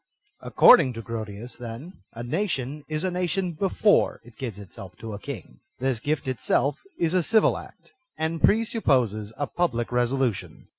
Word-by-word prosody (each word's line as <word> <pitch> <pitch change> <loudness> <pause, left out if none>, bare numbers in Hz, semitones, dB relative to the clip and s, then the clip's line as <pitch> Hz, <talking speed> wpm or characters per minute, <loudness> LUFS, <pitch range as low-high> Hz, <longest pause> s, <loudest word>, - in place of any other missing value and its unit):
Ac - - -8
cording 145 - +7
to 115 - -6
Grotius, 110 +1 -6
then, 120 +9 -9
a 120 - -6
nation 140 -1 -2
is 155 +1 -3
a 185 - 0
nation 180 +1 -1
before 195 +5 +2
it 120 -1 -17
gives 115 -4 -5
itself 95 -2 -11
to 110 -1 -7
a 100 - -6
king. 100 - -8 0.2
This 130 -3 0
gift 145 +2 -2
itself 130 +2 +1 0.2
is 170 0 +1
a 185 - +4
civil 220 +6 +4
act, - - -11 0.3
and 160 0 -2
presupxx>ses 130 - +2
a 145 - -1
public 130 -9 -1
resolution. 125 -2 -1
130 Hz, 160 wpm, -25 LUFS, 115-165 Hz, 0.3 s, cording